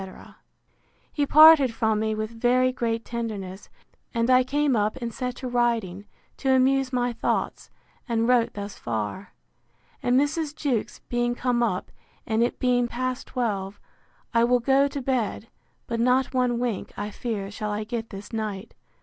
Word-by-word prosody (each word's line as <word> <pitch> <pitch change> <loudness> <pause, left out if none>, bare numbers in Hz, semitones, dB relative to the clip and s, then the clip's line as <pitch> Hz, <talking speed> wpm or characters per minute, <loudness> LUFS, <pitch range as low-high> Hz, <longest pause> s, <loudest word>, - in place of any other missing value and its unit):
He 290 -2 0
parted 310 -4 +8
from 220 -2 +1
me 220 0 0
with 215 +1 -3
very 250 +2 +2
great 230 -2 -2
tenderness; 205 -5 -5 0.5
and 230 +2 +2
I 255 0 +6
came 285 +1 +1
up 210 0 +1
and 235 -2 -5
set 250 0 -3
to 260 - -6
writing, 230 -6 0 0.3
to 265 -1 +2
amuse 265 0 +2
my 245 -1 0
thoughts, - - -2 0.4
and 230 0 +1
wrote 245 -2 +2
thus 200 0 -7
far. 115 - -4 0.7
And 245 +1 +3
Mrs. 300 +1 -1
Jewkes 260 -9 -2
being 240 0 0
come 245 -1 0
up, 210 -6 -1 0.3
and 220 +1 0
it 240 - +1
being 245 -1 +2
past 255 +1 -3
twelve, 205 -5 -3 0.5
I 230 0 +4
will 245 +1 +3
go 270 +3 +3
to 280 0 -5
bed; 240 -4 -1 0.4
but 230 -1 -3
not 255 +2 +2
one 250 -2 +1
wink, 235 -5 -3
I 205 +1 -4
fear, 205 -3 -4
shall 215 0 -4
I 210 +1 -2
get 225 0 -5
this 200 +2 -10
night. 215 -2 -4
240 Hz, 160 wpm, -25 LUFS, 215-255 Hz, 0.7 s, parted